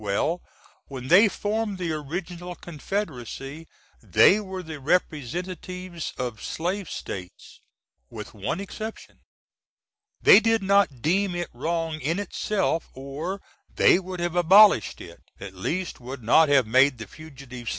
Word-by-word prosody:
Well 105 - -1 0.5
when 130 -2 -8
they 200 +6 +7
formed 210 0 -2
the 175 -3 -3
Original 175 +4 -5
Confed^y 155 - -6 0.3
they 115 - +5
were 190 -3 -6
the 160 -2 -8
Rep's 175 +4 -3
of 120 -4 -4
Slave 180 +2 -3
States, 90 -2 -8 0.5
with - - -9
one 110 - -3
exception. 215 +3 -8 1.0
They 200 - +8
did 225 -1 +1
not 195 - +2
deem 185 +2 +1
it 175 -3 -3
wrong 160 +4 -2
in 160 +6 -1
itself, 200 -3 -1
or 145 +9 -6 0.3
they - - +5
would 185 -1 -7
have 175 0 -2
abolished 180 - +6
it - - -12 0.2
at 95 -1 -8
least 170 - -3
would 125 0 -8
not 155 +7 +5
have 135 -4 +4
made 130 +4 +4
the 115 - -7
"Fugitive 135 -6 -11
S. - - +1
165 Hz, 135 wpm, -25 LUFS, 135-185 Hz, 1.0 s, They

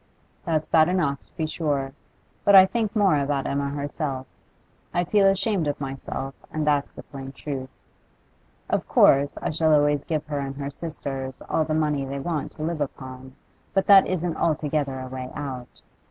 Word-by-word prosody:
'That's 155 -3 0
bad 160 0 +4
enough, 160 -7 0
to - - -30
be 160 - -2
sure, 145 -4 -2 0.5
but 200 - +6
I 190 -1 +11
think 220 +2 -2
more 195 -8 +4
about 140 -1 -1
Emma 140 0 -1
herself. 140 -1 -3 0.7
I 175 - +3
feel 195 +2 +4
ashamed 195 -3 +1
of 145 0 -2
myself, 135 0 -5 0.2
and 155 -1 -2
that's 145 -2 +1
the - - -11
plain 135 -1 -8
truth. 135 -2 -5 1.0
Of - - -1
course 140 +1 +4
I - - 0
shall 155 0 +3
always 145 -1 +2
give 155 -2 -2
her 145 -2 -3
and 135 0 -4
her 140 0 -4
sisters 135 -4 -5
all 160 - +1
the 155 0 -1
money 150 -3 +1
they 135 +1 -4
want 155 0 -3
to 155 - -7
live 165 -1 -2
upon, 130 -1 -6 0.4
but 195 - +3
that 195 -1 +8
isn't 175 -2 -1
altogether 150 -4 0
a 130 - -5
way 130 0 -6
out. 130 -4 -6
145 Hz, 180 wpm, -25 LUFS, 135-165 Hz, 1.0 s, I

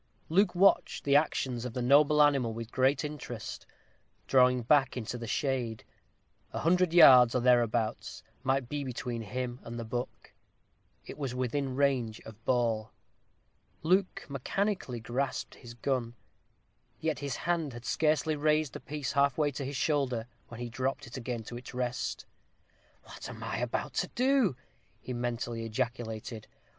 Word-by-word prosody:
Luke 180 +3 +3
watched 195 +2 +3
the 140 0 +3
actions 130 -5 +1
of 125 -2 -5
the 125 - -3
noble 150 +3 +6
animal 135 -6 +2
with 115 0 -6
great 130 +3 +2
interest, 125 -7 -7 0.6
drawing 125 -2 +4
back 135 +1 +3
into 125 0 -4
the 115 -1 -6
shade. 120 -3 -1 0.7
A - - -3
hundred 180 +1 +3
yards, 130 -8 +8
or - - +3
thereabouts, 120 -3 +1 0.2
might 135 0 0
be 145 +2 -3
between 125 -2 -4
him 125 +3 -4
and 120 0 -7
the 115 - -4
buck. 120 +2 -5 0.7
It - - -9
was 135 -4 -3
within 130 +1 -1
range 130 -6 +1
of 110 +1 -13
ball. 115 -3 +1 0.9
Luke 185 +3 +1
mechanically 140 - -2
grasped 125 +5 -3
his 120 -2 -12
gun; 120 -1 -2 0.8
yet 160 -3 -1
his 140 -3 -3
hand 165 -4 -1
had 120 +1 -9
scarcely 155 0 +1
raised 150 -1 +1
the - - -6
piece 150 -2 -4
half 140 -2 +2
way 150 -2 +2
to 140 +1 -5
his 140 +2 -4
shoulder, 130 -5 0 0.2
when 115 - -10
he 120 -1 -5
dropped 135 +3 -2
it 120 - -10
again 120 -2 -4
to 120 +2 -7
its 125 0 -10
rest. 125 0 -2 0.8
"What - - -9
am - - -8
I - - -3
about - - -2
to - - -4
do?" 255 - +2 0.4
he 130 - -6
mentally 120 -1 -3
ejaculated. 115 -1 -4
130 Hz, 155 wpm, -30 LUFS, 120-145 Hz, 0.9 s, yards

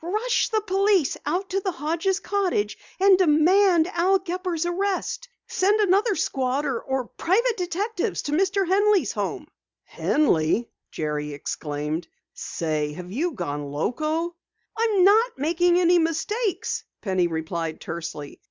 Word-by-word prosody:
Rush 435 +8 0
the 440 -2 +1
police 390 -5 +2
out 365 +6 -1
to 390 - +1
the 380 -2 -2
Hodges' 330 +7 -1
cottage 375 - -1 0.2
and 385 -1 +6
demand 350 +2 +4
Al 370 +2 +2
Gepper's 360 -2 -3
arrest! 395 +7 -2 0.2
Send 405 +3 +1
another 410 +2 +3
squad 270 -2 -1
or 265 -5 -2
some 265 -2 -1
private 460 +7 +2
detectives 390 +3 -2
to 290 - -4
Mr. 385 +4 +1
Henley's 395 - +3
home." 205 +7 -3 0.4
"Henley!" 230 - +1 0.2
Jerry 150 -1 -3
exclaimed. 150 +3 -4 0.3
"Say, 155 -2 -3
have 180 +3 -9
you 320 - -1
gone 145 - -4
loco?" 310 - -2 0.4
"I'm 445 -4 +2
not 445 +5 +4
making 345 +5 +2
any 350 0 +4
mistakes," 355 +7 -1 0.2
Penny 185 -4 +1
replied 165 0 -4
tersely. 160 -4 -7
345 Hz, 130 wpm, -24 LUFS, -, 0.4 s, and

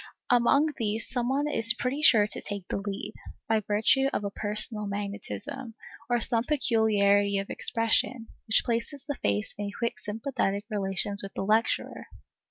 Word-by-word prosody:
Among 250 +5 +4
these 220 -2 -2
some 245 -1 -1
one 280 +2 +1
is 230 -5 +3
pretty 255 +4 -2
sure 220 -8 +6
to 210 - -6
take 200 -3 -6
the - - -1
lead, 200 -1 -5 0.3
by 220 -1 +2
virtue 215 +6 +2
of - - -2
a 200 - -3
personal 210 +1 -2
magnetism, 215 +5 -5 0.3
or 240 0 +2
some 230 0 +1
peculiarity 210 -7 +3
of 195 0 -3
expression, 225 +1 0 0.2
which 220 - +4
places 240 +4 -2
the 285 - -2
face 105 - -1
in 205 -1 -2
quick 235 +3 -3
sympathetic 210 -2 -2
relations 200 0 +1
with 195 - -8
the 195 - -2
lecturer. 220 +3 0
220 Hz, 160 wpm, -28 LUFS, 205-240 Hz, 0.3 s, sure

